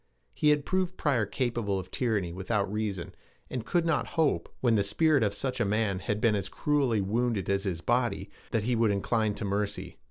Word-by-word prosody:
He 150 - +2
had 150 -1 +3
proved 185 -1 0
Pryor 125 -8 +1
capable 120 -5 -1
of 95 -1 -6
tyranny 105 -9 0
without 100 +2 -1
reason, 105 -5 -3 0.4
and 125 -3 -3
could 175 -1 +2
not 165 -4 +1
hope, 160 -3 +2
when 120 -3 +3
the 105 - +4
spirit 150 +9 +3
of 105 -2 +2
such 130 +2 -3
a - - +3
man 105 -2 0
had 105 +2 -2
been 115 -1 +3
as 100 -1 -2
cruelly 135 -8 +1
wounded 110 0 0
as 100 +1 0
his 85 -4 -2
body, 120 +3 0 0.2
that 110 - 0
he 120 +2 +1
would 115 -1 +3
incline 105 +1 +1
to 105 - -4
mercy. 100 +1 -3
110 Hz, 200 wpm, -29 LUFS, 100-130 Hz, 0.4 s, the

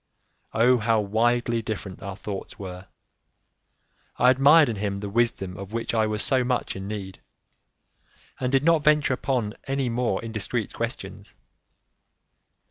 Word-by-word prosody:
Oh, 120 +2 +4
how 110 0 +2
widely 115 +3 +1
different 105 -3 -6
our 95 0 -6
thoughts 100 -2 -6
were! 95 -1 -8 1.3
I 125 +2 +6
admired 145 +4 +6
in 115 -3 -3
him 100 -1 -2
the 100 0 -5
wisdom 115 -5 0
of 100 +2 -8
which 115 0 -2
I 110 -1 +2
was 105 -1 -2
so 130 -2 +2
much 125 0 -1
in 95 0 -6
need, 100 -3 -6 1.2
and 125 -1 -1
did 135 0 +3
not 165 -1 +4
venture 150 -3 +4
upon 120 -4 -1
any 135 -2 0
more 120 +1 0
indiscreet 110 -3 -3
questions. - - -5
115 Hz, 140 wpm, -25 LUFS, 100-125 Hz, 1.3 s, I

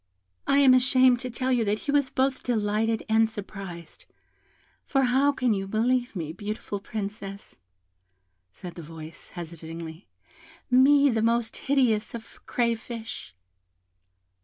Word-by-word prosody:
"I 275 - +4
am 275 -2 +7
ashamed 255 -1 +5
to 250 0 -4
tell 255 +2 -2
you 245 -2 +3
that 205 +1 +1
he 285 - 0
was 285 -2 +2
both 265 0 0
delighted 220 -1 0
and 220 0 +3
surprised. 195 -6 -8 0.8
For 270 -1 +1
how 265 +3 +3
can 255 -4 +1
you 195 -1 -3
believe 245 +3 0
me, 160 -3 -4
beautiful 205 +1 -5
Princess?" 200 - -7 0.9
said 175 - -9
the 170 - -9
voice, 160 0 -11
hesitatingly, 165 0 -8 0.6
"me, 280 +2 +6
the 225 -1 0
most 230 0 +1
hideous 245 -6 +1
of 225 -1 -11
crayfish?" 230 - -3
225 Hz, 130 wpm, -26 LUFS, 195-255 Hz, 0.9 s, am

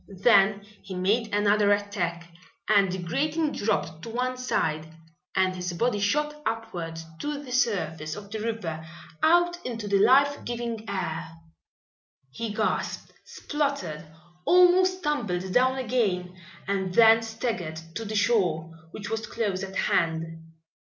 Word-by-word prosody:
Then 200 -3 +5 0.2
he 190 -1 -8
made 215 +5 +1
another 205 0 +3
attack 175 -5 -1 0.4
and 200 -3 +4
the 185 - -2
grating 300 - -1
dropped 165 -6 -1
to 230 - -7
one 250 +2 -1
side 160 -11 -1 0.4
and 185 -1 +2
his 180 -1 -4
body 230 +3 0
shot 300 +8 0
upward 175 - -4 0.2
to 295 0 -3
the 255 - -10
surface 160 - 0
of 200 -1 -10
the 220 - -3
river, 210 -8 -3 0.4
out 345 +2 +3
into 230 -4 -4
the 200 -1 +2
life 280 +6 +4
giving 235 -2 -4
air. 170 -5 -3 1.0
He 225 +9 -4
gasped, 215 +1 -2
spluttered, 190 - -3 0.4
almost 365 - +5
tumbled 190 - -1
down 260 +1 +3
again, 205 -8 -1 0.3
and 190 -2 -1
then 225 -1 +7
staggered 225 -8 -3
to 225 - -4
the 215 0 -5
shore, 185 -7 +1 0.2
which 205 +4 -7
was 225 0 -3
close 205 -5 -2
at 190 0 -6
hand. 165 -1 +1
210 Hz, 135 wpm, -26 LUFS, 180-245 Hz, 1.0 s, then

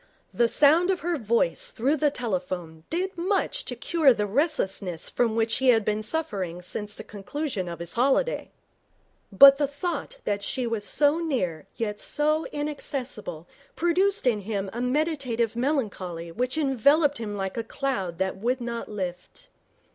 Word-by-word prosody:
The 235 - +3
sound 305 +9 +5
of 375 -2 +1
her 340 -2 -1
voice 220 -6 +1
through 275 +7 0
the 295 +1 +3
telephone 180 - -4
did 370 +3 -2
much 375 +4 0
to - - -4
cure 310 -7 +3
the 210 - 0
restlessness 200 - -1
from 230 -2 +1
which 225 0 +1
he 265 - 0
had 225 -4 +4
been 215 0 0
suffering 200 - -2
since 205 +3 -5
the - - -8
conclusion 210 - -4
of 170 - -6
his 170 0 -5
holiday. 275 - +1 0.8
But 275 +7 +9
the 290 - +2
thought 350 - -4
that 205 0 -1
she 250 +5 -2
was 225 -3 -2
so 295 +6 +2
near 185 - -2
yet 210 -2 -3
so 305 +2 +1
inaccessible 290 - -5 0.3
produced 375 +3 +2
in 235 -4 +3
him 200 -1 -3
a 235 - -3
meditative 250 -4 0
melancholy 200 - -2
which 250 - -2
enveloped 285 +1 +3
him 210 -2 -4
like 195 -1 -3
a 230 - -2
cloud 220 -9 -3
that 190 +1 -1
would 245 +6 0
not 235 -1 -5
lift. 190 - -6
240 Hz, 160 wpm, -26 LUFS, 205-295 Hz, 0.8 s, But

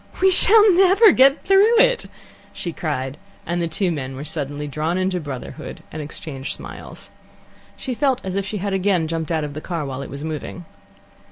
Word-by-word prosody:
"We 380 0 +5
shall 420 +2 +6
never 385 +4 +6
get 275 0 +4
through 400 +5 +5
it!" - - +3 0.5
she 170 - -5
cried, 140 -4 -4 0.3
and 175 0 -2
the 170 - 0
two 180 +3 -1
men 135 -4 -5
were 140 +3 -7
suddenly 145 -1 -4
drawn 155 +4 -2
into 185 -1 0
brotherhood, 140 -5 -8
and 155 - -6
exchanged 145 -2 -7
smiles. - - -10 0.7
She 260 - -4
felt 265 0 +1
as 190 0 -3
if 200 - 0
she 195 +2 -5
had 200 0 -3
again 190 -4 +1
jumped 165 0 -3
out 160 -2 0
of 145 -1 -5
the 155 - -6
car 165 -3 -4
while 135 0 -5
it - - -7
was 140 +2 -7
moving. 160 +3 -6
170 Hz, 190 wpm, -21 LUFS, -, 0.7 s, shall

